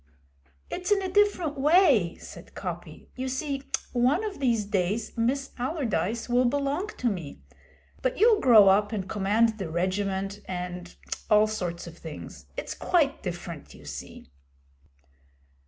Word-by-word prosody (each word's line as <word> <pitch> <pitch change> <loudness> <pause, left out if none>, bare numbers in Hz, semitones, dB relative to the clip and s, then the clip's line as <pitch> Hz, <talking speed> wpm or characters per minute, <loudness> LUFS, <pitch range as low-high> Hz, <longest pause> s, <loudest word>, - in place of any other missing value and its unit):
'It's 360 0 -3
in 410 - +5
a 375 - -3
different 365 -7 +2
way,' 285 - +4
said - - -12
Coppy. - - -7
'You 260 0 -3
see, 275 +1 -2 0.3
one 255 - +3
of 415 -6 -4
these 235 -6 +1
days 200 +2 -1
Miss 265 +4 0
Allardyce 235 - -1
will 245 +1 +3
belong 285 +8 0
to 250 - 0
me, 165 - -4 0.6
but 255 - 0
you'll 435 +1 +5
grow 225 - +7
up 205 +2 +4
and 200 -4 -3
command 215 +3 +2
the 190 -4 -3
Regiment 190 +3 -1
and 180 -1 -5 0.3
all 210 0 +6
sorts 180 -6 -3
of 170 0 -11
things. 160 -2 -9
It's - - -4
quite 300 -6 +1
different, 175 -4 -6
you 75 - -15
see.' 70 -2 -9
225 Hz, 140 wpm, -27 LUFS, 185-275 Hz, 0.6 s, grow